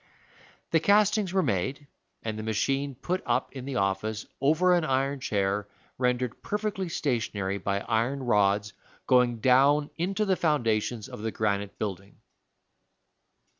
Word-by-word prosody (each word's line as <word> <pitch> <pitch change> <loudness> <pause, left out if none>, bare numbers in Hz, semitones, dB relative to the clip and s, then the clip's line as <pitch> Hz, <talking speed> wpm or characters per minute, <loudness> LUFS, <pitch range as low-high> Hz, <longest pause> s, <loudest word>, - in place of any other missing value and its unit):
The 165 - +4
castings 205 +1 +3
were 190 0 +2
made, 130 +10 -1 0.4
and 110 -1 -3
the 110 - -5
machine 135 +6 -1
put 180 +8 -2
up - - 0
in 130 -2 -7
the 140 -1 -4
office, 105 +1 -1 0.2
over 160 +6 +4
an 175 -2 +3
iron 135 -1 0
chair 100 -3 -1 0.3
rendered 125 -1 0
perfectly 205 -3 -2
stationary 105 -9 -1
by 100 +1 -1
iron 120 +6 0
rods 105 -2 +2 0.3
going 125 -3 +3
down 140 +4 +4
into 195 +5 0
the 190 -2 +2
foundations 120 - 0
of - - -9
the 110 - -1
granite 100 -2 -2
building. 100 -2 -5
125 Hz, 135 wpm, -27 LUFS, 105-150 Hz, 0.4 s, The